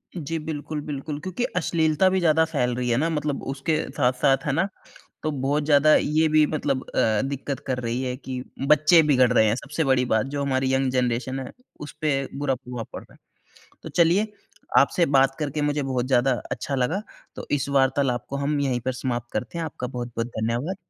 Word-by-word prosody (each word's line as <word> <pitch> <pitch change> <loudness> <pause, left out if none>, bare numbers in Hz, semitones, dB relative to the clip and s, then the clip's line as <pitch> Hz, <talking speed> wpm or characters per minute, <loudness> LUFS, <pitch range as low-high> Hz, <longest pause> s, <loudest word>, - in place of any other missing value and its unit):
जी, 165 0 -3
बिल्कुल, 150 -1 -5
बिल्कुल। 145 0 -5
क्योंकि 185 +9 -4
अश्लीलता 160 +1 +2
भी 190 - +1
ज़्यादा 160 -2 +4
फैल 125 -6 -1
रही 125 0 -2
है 115 - +2
ना 160 +5 +1
मतलब 150 -2 -2
उसके 145 +4 -1 0.2
साथ-साथ 130 +2 +2
है 145 - +1
ना 170 +8 +1 0.6
तो 155 - 0
बहुत 145 +2 0
ज़्यादा 150 0 +5
ये 155 +2 +2
भी 155 -1 +6
मतलब 140 -4 -1
अ, 110 -2 +2
दिक्क़त 140 0 -4
कर 130 -1 -1
रही 120 +1 -2
है 125 0 -2
कि 130 -2 -6 0.2
बच्चे 155 +3 +6
बिगड़ 130 -4 +4
रहे 110 - +5
हैं 110 - +2
सबसे 150 +4 -3
बड़ी 130 -2 +2
बात 110 0 +1
जो 140 - -1
हमारी 130 -1 0
यंग 130 0 +1
जेनरेशन 125 +1 -1
है, 130 - -7 0.3
उसपे 145 -2 -2
बुरा 140 -2 0
प्रभाव 125 -2 -7
पड़ - - -7
रहा - - -21
है। - - -27 0.5
तो - - -7
चलिए 180 +6 +3 0.5
आपसे 175 -3 +3
बात 135 -2 +3
करके 150 0 -2
मुझे 145 0 0
बहुत 130 -2 -1
ज़्यादा 130 0 +3 0.2
अच्छा 140 - -3
लगा 135 +10 0 0.3
तो - - -7
इस 140 -2 0
वार्तालाप 135 -2 +1
को 140 - -4
हम 145 +1 0
यहीं 130 -3 0
पर 130 +2 -2
समाप्त 120 -2 -4
करते 120 +10 -3
हैं, 165 - -2
आपका 125 -5 -5
बहुत-बहुत 120 -2 -4
धन्यवाद। 120 +10 -2
135 Hz, 200 wpm, -24 LUFS, 125-150 Hz, 0.6 s, भी